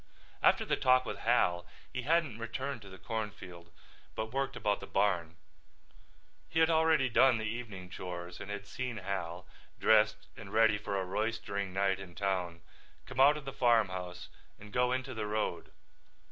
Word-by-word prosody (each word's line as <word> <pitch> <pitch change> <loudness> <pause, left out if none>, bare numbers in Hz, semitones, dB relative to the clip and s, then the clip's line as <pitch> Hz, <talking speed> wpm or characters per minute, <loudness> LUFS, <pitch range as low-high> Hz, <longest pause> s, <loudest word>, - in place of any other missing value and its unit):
After - - +4
the - - +1
talk 130 0 +4
with - - -5
Hal 90 -7 +2 0.3
he 125 - -2
hadn't 150 -4 +1
returned 120 +3 -4
to 100 - -11
the 95 - -11
cornfield 95 -6 -6 0.4
but 110 +2 -4
worked 135 0 -1
about 105 -1 0
the - - -9
barn. 90 -5 +1 1.1
He 160 - -4
had 160 0 +5
already 160 -4 +4
done 125 +1 +5
the 110 - -4
evening 110 -5 -5
chores 90 -1 -6
and - - -8
had 100 0 -5
seen 125 +2 -4
Hal, 90 -3 -4 0.3
dressed 110 0 +4
and 100 -3 -10
ready 110 -1 +4
for 100 -1 -2
a 95 - -2
roistering 100 0 -2
night 95 0 +1
in 90 -3 -10
town, 90 -2 -2 0.4
come 130 0 -7
out 145 +3 +7
of 150 - -9
the 135 - -5
farmhouse 95 -8 +1 0.3
and 105 +1 -13
go 125 0 +2
into 130 0 -2
the 110 -2 -3
road. 105 +1 -2
105 Hz, 170 wpm, -32 LUFS, 95-125 Hz, 1.1 s, out